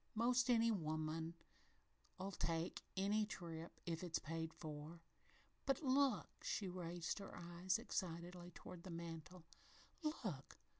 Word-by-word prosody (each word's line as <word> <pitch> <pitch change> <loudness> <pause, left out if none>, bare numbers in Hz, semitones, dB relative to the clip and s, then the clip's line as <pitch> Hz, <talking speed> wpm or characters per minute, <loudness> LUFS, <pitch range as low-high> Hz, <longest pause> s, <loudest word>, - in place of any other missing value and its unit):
'Most 245 +3 +5
any 230 -1 +7
woman'll 160 -2 0 1.0
take 165 0 +1 0.2
any 205 +3 +4
trip, 170 -5 -5
if 165 0 -1
it's 170 -2 +2
paid 160 0 -2
for 155 +1 -5 0.7
But 270 +3 +3
look!" 265 -6 +4
she 200 - +1
raised 175 0 -1
her 195 - -6
eyes 175 +3 +1
excitedly 175 -5 -2
toward 180 - -7
the 185 - -7
mantel, 170 0 -5 0.6
"Look! 215 - -2
175 Hz, 115 wpm, -44 LUFS, 165-210 Hz, 1.0 s, any